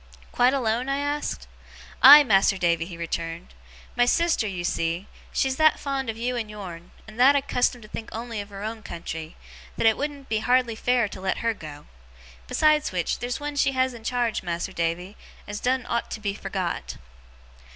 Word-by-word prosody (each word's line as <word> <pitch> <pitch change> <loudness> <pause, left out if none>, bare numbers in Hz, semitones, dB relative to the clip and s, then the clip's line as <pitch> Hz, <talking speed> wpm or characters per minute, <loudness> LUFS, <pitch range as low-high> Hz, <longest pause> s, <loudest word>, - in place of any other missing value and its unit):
'Quite 245 +1 +4
alone?' 245 0 0
I 275 - 0
asked. 290 +1 -3 0.6
'Aye, 290 +3 +11
Mas'r 195 -5 +3
Davy!' 170 -2 +1
he 175 -3 -9
returned. 165 - -5 0.4
'My 245 - +4
sister, 335 -7 +2
you 180 -3 -4
see, 170 +2 -1 0.3
she's 265 -1 0
that 310 0 +4
fond 275 -3 -3
of 225 - -4
you 245 +2 -2
and 225 -3 -3
yourn, 180 -5 -9 0.2
and 220 +2 -12
that 270 +3 +7
accustomed 250 -3 0
to - - -12
think 220 +1 -7
on'y 230 -1 -5
of 200 - -10
her 200 0 -8
own 220 +1 -5
country, 165 -4 -7 0.4
that - - 0
it 220 -1 +5
wouldn't 285 -2 -4
be 220 - 0
hardly 245 +1 +2
fair 245 0 +1
to 190 - -9
let 190 0 -1
her 230 - +2
go. 150 -6 -10 0.6
Besides 305 -1 +3
which, 180 -3 -1
theer's 245 +1 -3
one 295 0 -5
she 280 -1 +2
has 260 0 +1
in 230 -2 -11
charge, 240 -1 -1
Mas'r 175 +1 -4
Davy, 170 +4 -3 0.3
as 205 0 -5
doen't 255 0 0
ought 235 - -2
to - - -5
be 205 -2 -2
forgot. 185 - -4
225 Hz, 190 wpm, -25 LUFS, 185-255 Hz, 0.6 s, Aye